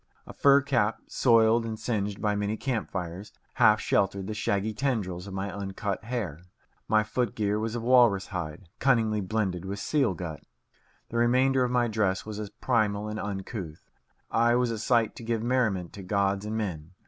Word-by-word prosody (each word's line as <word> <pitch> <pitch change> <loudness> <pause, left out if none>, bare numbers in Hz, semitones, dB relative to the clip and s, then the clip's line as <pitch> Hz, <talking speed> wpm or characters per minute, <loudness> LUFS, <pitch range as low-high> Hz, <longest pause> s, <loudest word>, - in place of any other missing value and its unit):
A - - -10
fur 140 0 +5
cap, 120 -6 +1
soiled 115 -1 +4
and 110 -1 -4
singed 105 -3 -2
by 105 -1 0
many 105 +1 -1
camp 120 -5 -2
fires, 90 +2 -5 0.3
half - - +6
sheltered 100 -1 +1
the 110 - -4
shaggy 105 0 -1
tendrils 100 -8 -2
of 100 - -8
my 95 0 -3
uncut 100 0 -4
hair. 105 - -3 0.5
My 110 0 +3
foot 110 +2 -2
gear 105 -1 0
was 110 +1 -2
of 120 - -3
walrus 120 -6 +5
hide, 85 0 -5
cunningly 110 -5 +2
blended 95 -3 -1
with 100 +1 -4
seal 125 -1 +1
gut. 80 -4 -6 0.7
The 115 - -3
remainder 130 +2 +3
of 125 - 0
my 120 -1 +2
dress 105 -4 0
was 105 -1 -6
as 105 -2 -5
primal 105 -4 0
and 105 0 -4
uncouth. 95 -5 -6 0.4
I 120 +1 +3
was 125 -1 +1
a 115 - -3
sight 115 -1 +2
to - - -8
give 115 -1 -1
merriment 115 -8 0
to 100 - -8
gods 100 +1 0
and 110 +1 -2
men. 90 -6 -4
105 Hz, 185 wpm, -28 LUFS, 100-115 Hz, 0.7 s, half